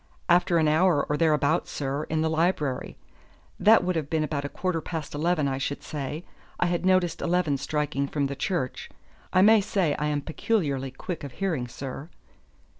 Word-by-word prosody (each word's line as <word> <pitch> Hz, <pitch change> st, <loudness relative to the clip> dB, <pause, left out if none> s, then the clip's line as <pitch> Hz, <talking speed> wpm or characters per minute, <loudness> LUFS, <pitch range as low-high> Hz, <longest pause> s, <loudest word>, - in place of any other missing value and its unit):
"After 175 Hz, 0 st, +4 dB
an 160 Hz, -1 st, +3 dB
hour 155 Hz, -1 st, +3 dB
or 150 Hz, -, 0 dB
thereabouts, 155 Hz, 0 st, +2 dB
sir, 140 Hz, +1 st, -3 dB
in 155 Hz, 0 st, -1 dB
the 160 Hz, -, +1 dB
library. 160 Hz, -5 st, 0 dB, 0.6 s
That 220 Hz, -1 st, +6 dB
would 180 Hz, 0 st, 0 dB
have 155 Hz, -3 st, -2 dB
been 160 Hz, -1 st, +1 dB
about 150 Hz, -2 st, -2 dB
a 145 Hz, -, -4 dB
quarter 170 Hz, +3 st, -2 dB
past 160 Hz, -2 st, -5 dB
eleven, 155 Hz, 0 st, +1 dB
I 135 Hz, -1 st, -2 dB
should 145 Hz, +1 st, -3 dB
say; 150 Hz, +2 st, -5 dB, 0.3 s
I -, -, +3 dB
had 175 Hz, +1 st, 0 dB
noticed 185 Hz, -3 st, +2 dB
eleven 175 Hz, -4 st, +1 dB
striking 145 Hz, 0 st, -1 dB
from 145 Hz, 0 st, -1 dB
the 140 Hz, 0 st, -3 dB
church. 165 Hz, -5 st, -3 dB, 0.4 s
I 185 Hz, -, +5 dB
may 215 Hz, +1 st, +7 dB
say 190 Hz, -6 st, 0 dB
I 150 Hz, -, 0 dB
am 145 Hz, -1 st, 0 dB
peculiarly 145 Hz, -5 st, -1 dB
quick 170 Hz, +6 st, -6 dB
of 140 Hz, -3 st, -7 dB
hearing, 160 Hz, -10 st, -2 dB
sir." 135 Hz, +5 st, -7 dB
155 Hz, 185 wpm, -26 LUFS, 140-175 Hz, 0.6 s, may